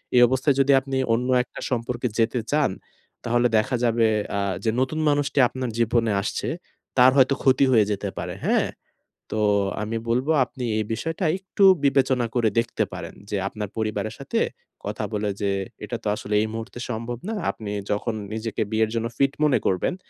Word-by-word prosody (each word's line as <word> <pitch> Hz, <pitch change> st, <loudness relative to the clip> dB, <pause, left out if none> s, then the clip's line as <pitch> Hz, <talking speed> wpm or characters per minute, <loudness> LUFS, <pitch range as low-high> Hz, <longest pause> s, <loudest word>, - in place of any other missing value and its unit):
এই 125 Hz, -, +7 dB
অবস্থায় 130 Hz, +3 st, +2 dB
যদি 135 Hz, +1 st, +4 dB
আপনি 135 Hz, 0 st, -3 dB, 0.2 s
অন্য 125 Hz, +2 st, 0 dB, 0.2 s
একটা -, -, -11 dB
সম্পর্কে 125 Hz, 0 st, -1 dB
যেতে 115 Hz, +2 st, +2 dB
চান, 150 Hz, -7 st, +2 dB, 0.5 s
তাহলে 120 Hz, +1 st, +2 dB
দেখা 110 Hz, +4 st, +1 dB
যাবে 115 Hz, -1 st, +3 dB, 0.3 s
আ -, -, +1 dB, 0.2 s
যে 115 Hz, -, +1 dB
নতুন 130 Hz, +4 st, -1 dB
মানুষটি 145 Hz, -1 st, +1 dB
আপনার 130 Hz, -1 st, -4 dB
জীবনে 115 Hz, -1 st, +2 dB
আসছে, -, -, -3 dB, 0.5 s
তার 125 Hz, +1 st, +7 dB
হয়তো 135 Hz, 0 st, +5 dB
ক্ষতি 135 Hz, 0 st, +5 dB
হয়ে 110 Hz, -4 st, +5 dB
যেতে 100 Hz, -, -2 dB
পারে। -, -, -4 dB
হ্যাঁ? -, -, +3 dB, 0.7 s
তো 110 Hz, -, 0 dB, 0.4 s
আমি 110 Hz, +2 st, -3 dB
বলব 125 Hz, +3 st, +1 dB, 0.2 s
আপনি 125 Hz, 0 st, -8 dB
এই 110 Hz, -, 0 dB
বিষয়টা 165 Hz, -, -3 dB
একটু 195 Hz, +1 st, 0 dB, 0.2 s
বিবেচনা 130 Hz, -3 st, +3 dB
করে 115 Hz, -3 st, +3 dB
দেখতে 115 Hz, 0 st, +1 dB
পারেন। -, -, -7 dB, 0.2 s
যে 105 Hz, -, -1 dB
আপনার 105 Hz, -1 st, -5 dB
পরিবারের 110 Hz, -1 st, -2 dB
সাথে -, -, -2 dB, 0.4 s
কথা -, -, -3 dB
বলে 105 Hz, 0 st, -1 dB
যে 100 Hz, -1 st, +1 dB, 0.3 s
এটা -, -, -4 dB
তো -, -, -2 dB
আসলে 105 Hz, 0 st, -4 dB
এই -, -, 0 dB
মুহূর্তে 115 Hz, +2 st, -6 dB
সম্ভব 115 Hz, +1 st, -4 dB
না 225 Hz, -, -2 dB, 0.2 s
আপনি 105 Hz, -2 st, -6 dB, 0.2 s
যখন 105 Hz, +3 st, -1 dB, 0.2 s
নিজেকে 110 Hz, 0 st, -3 dB
বিয়ের 110 Hz, 0 st, +2 dB
জন্য 115 Hz, 0 st, -1 dB
ফিট 135 Hz, 0 st, +3 dB
মনে 145 Hz, -4 st, +4 dB
করবেন 95 Hz, -, +1 dB
120 Hz, 175 wpm, -24 LUFS, 110-130 Hz, 0.7 s, এই